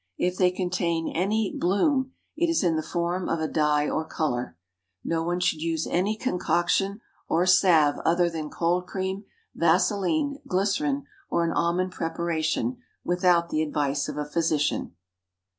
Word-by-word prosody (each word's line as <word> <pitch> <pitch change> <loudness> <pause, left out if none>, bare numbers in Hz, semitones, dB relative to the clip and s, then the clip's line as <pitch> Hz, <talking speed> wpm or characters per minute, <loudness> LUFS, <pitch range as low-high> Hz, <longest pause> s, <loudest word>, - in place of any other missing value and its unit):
If 180 0 0
they 180 -1 +5
contain 180 -2 -1
any 205 +5 0
"bloom," 260 - +1 0.2
it 340 +2 +1
is 330 -8 +1
in 170 -3 +2
the 155 - 0
form 175 +2 -2
of 165 - 0
a 160 - -1
dye 150 -1 +1
or 160 - -1
color. 125 - -3 0.5
No 165 -1 -1
one 175 +2 -1
should 160 -3 0
use 165 -1 -1
any 200 +5 0
concoction 195 -1 0 0.3
or 170 +2 +2
salve 170 -6 +4
other 175 +1 +3
than 160 -3 -4
cold 175 +3 0
cream, 190 +1 -3 0.3
vaseline, 205 - +1
glycerine, 275 +9 0 0.2
or 170 - +1
an 165 - 0
almond 180 +2 0
preparation, 165 +7 -1 0.3
without 175 -1 +2
the 155 - 0
advice 145 -2 -1
of - - -6
a 150 - -2
physician. 150 - 0
175 Hz, 150 wpm, -26 LUFS, 160-190 Hz, 0.5 s, they